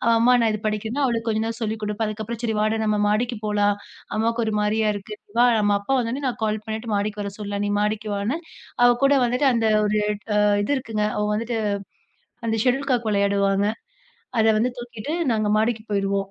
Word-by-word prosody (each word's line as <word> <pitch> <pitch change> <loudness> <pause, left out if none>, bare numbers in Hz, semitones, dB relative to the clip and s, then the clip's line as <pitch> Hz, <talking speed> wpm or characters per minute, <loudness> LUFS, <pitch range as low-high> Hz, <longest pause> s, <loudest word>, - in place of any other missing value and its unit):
"அம்மா 235 +2 +5
நான் 225 -1 +3
இத 215 - -4
படிக்குறேனா" 220 +6 -2
அவளுக்கு 230 -2 -1
கொஞ்ச 220 0 0
நேரம் 230 +1 -5
சொல்லி 220 0 -1
குடுப்பேன். 210 +1 -1
அதுக்கப்புறம் 220 +2 -5
'சரி, 220 -2 0
வாடா 215 +1 +1
நம்ப 210 -1 +1
மாடிக்கு 230 +2 0
போலாம். 205 -1 +2 0.4
அம்மாவுக்கு 230 +2 +1
ஒரு 220 - -1
மாதிரியா 215 +1 +1
இருக்கு, 205 +1 -7
நீ - - -45
வா 245 - +7
நம்ப 205 -1 +3
அப்பா 200 +7 -2
வந்த 230 -1 -1
உடனே 280 +1 -4
நான் 245 - -4
கால் 215 0 -2
பண்ணிட்டு 220 0 -3
மாடிக்கு 205 +1 -2
வர 200 - -4
சொல்லலாம். 205 -1 -3
நீ 205 - -1
மாடிக்கு 210 +1 -1
வான்னு.' 215 +11 -1 0.4
அவ 245 - +8 0.2
கூட 275 - +5
வந்துட்டு, 250 +4 +2
அந்த 230 -1 +1 0.2
ஒரு 210 +1 +1 0.5
அ - - +4 0.2
இது 285 - -1
இருக்குங்க. 225 -4 -2
அவ 210 - +1
வந்துட்டு 230 +1 -2 0.9
அந்த 225 - 0
ஷெட்யூல் 270 +2 +1
காக் 245 -3 +1
விளையாடுவாங்க. 200 -1 +2 0.7
அத 220 0 +4
வந்து 225 +4 +2
தூக்கிட்டு 240 +2 -6 0.2
நாங்க 215 -2 +1
மாடிக்கு 220 0 +1
போயிடுவோம். 195 -1 0
220 Hz, 200 wpm, -23 LUFS, 210-235 Hz, 0.9 s, அவ